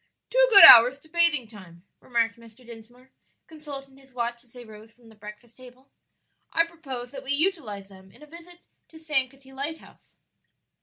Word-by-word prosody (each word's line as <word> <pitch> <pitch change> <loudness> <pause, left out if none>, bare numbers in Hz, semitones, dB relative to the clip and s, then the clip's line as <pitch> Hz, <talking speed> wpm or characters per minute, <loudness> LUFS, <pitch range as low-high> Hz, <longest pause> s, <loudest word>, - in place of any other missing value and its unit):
"Two - - +2
good 400 -4 +9
hours 245 +3 +8
to 315 +3 -22
bathing 335 -7 +1
time," 185 -6 -17 0.2
remarked 230 -3 -3
Mr. 230 +1 -20
Dinsmore, 240 +3 -17 0.3
consulting 280 -4 -12
his 265 -2 -24
watch 235 0 -5
as 240 - -26
they 245 -1 -14
rose 215 0 -16
from 230 0 -23
the 220 - -20
breakfast 210 +2 -15
table. 255 +1 -19 0.6
"I 330 0 +1
propose 270 -8 -8
that 270 -1 -11
we 270 +1 -4
utilize 285 - -4
them 190 -1 -19
in 300 - -20
a - - -13
visit 340 +3 -17 0.2
to 320 - -18
Sankaty 270 -4 -5
lighthouse." 285 +4 -10
255 Hz, 170 wpm, -23 LUFS, 230-300 Hz, 0.6 s, good